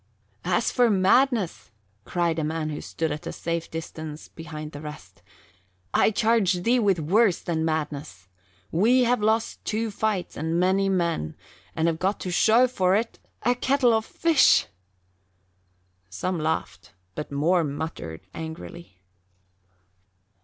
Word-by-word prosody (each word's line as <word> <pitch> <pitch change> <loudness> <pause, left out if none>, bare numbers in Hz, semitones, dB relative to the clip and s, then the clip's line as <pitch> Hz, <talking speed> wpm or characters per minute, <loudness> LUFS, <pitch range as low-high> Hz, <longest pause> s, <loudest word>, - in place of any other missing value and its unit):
"As 185 +6 +1
for 245 -1 +3
madness," 210 +1 +2 0.4
cried 170 -2 0
a - - -1
man 155 0 -2
who 150 - -5
stood 160 -2 -3
at 150 +1 -5
a - - -3
safe 170 0 -3
distance 160 -1 -7
behind 155 -1 -8
the 145 - -9
rest, 95 - -10 0.7
"I - - +4
charge 215 -5 +2
thee 245 +4 +3
with 200 -5 +3
worse 190 +5 +3
than 160 -2 -2
madness. 150 - -3 0.4
We 235 +9 +4
have 245 -1 +2
lost 220 +2 0
two 220 +1 -2
fights 205 -3 -2
and 160 +3 -1
many 190 +2 +2
men 170 - -1 0.4
and 160 +1 +1
have 165 -1 0
got 195 +3 0
to 180 - -3
show 225 +7 +5
for 190 -6 +2
it 225 +2 -2 0.2
a 245 - +3
kettle 255 -1 +2
of 220 0 +2
fish." 325 +4 +4 1.4
Some 175 - -3
laughed, 95 - -3 0.2
but 150 - -6
more 165 +5 +2
muttered 145 - -5
angrily. 160 - -9
175 Hz, 140 wpm, -25 LUFS, 155-220 Hz, 1.4 s, show